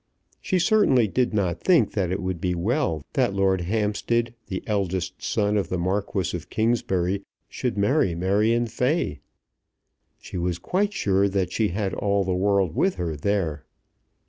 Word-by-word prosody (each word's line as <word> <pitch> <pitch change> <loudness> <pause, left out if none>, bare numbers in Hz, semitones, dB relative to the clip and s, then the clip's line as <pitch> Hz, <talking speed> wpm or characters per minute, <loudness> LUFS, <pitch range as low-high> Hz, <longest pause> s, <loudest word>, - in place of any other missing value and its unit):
She 185 - 0
certainly 180 - +4
did 125 +5 0
not 95 -6 -1
think 165 - +4
that 95 -4 -1
it 95 0 -2
would 90 -2 -3
be 90 -1 0
well 85 - 0
that 100 - +1
Lord 95 -2 +2
Hampstead, 110 +4 0
the 95 -2 -4
eldest 95 -3 -2
son 105 -1 0
of 100 - -1
the 90 - -1
Marquis 95 0 -1
of 85 -1 -7
Kingsbury, 100 -5 0 0.3
should 125 -4 -3
marry 100 - +2
Marion 105 +7 +2
Fay. 125 +8 -1 1.0
She 90 - -6
was 85 0 -1
quite 195 - 0
sure 100 - +1
that 95 -2 -1
she 110 - +2
had 100 +1 -2
all 100 -1 +1
the 95 0 -1
world 95 -2 +1
with 190 0 +2
her 85 -3 -3
there. 80 -3 -1
100 Hz, 160 wpm, -24 LUFS, 90-115 Hz, 1.0 s, certainly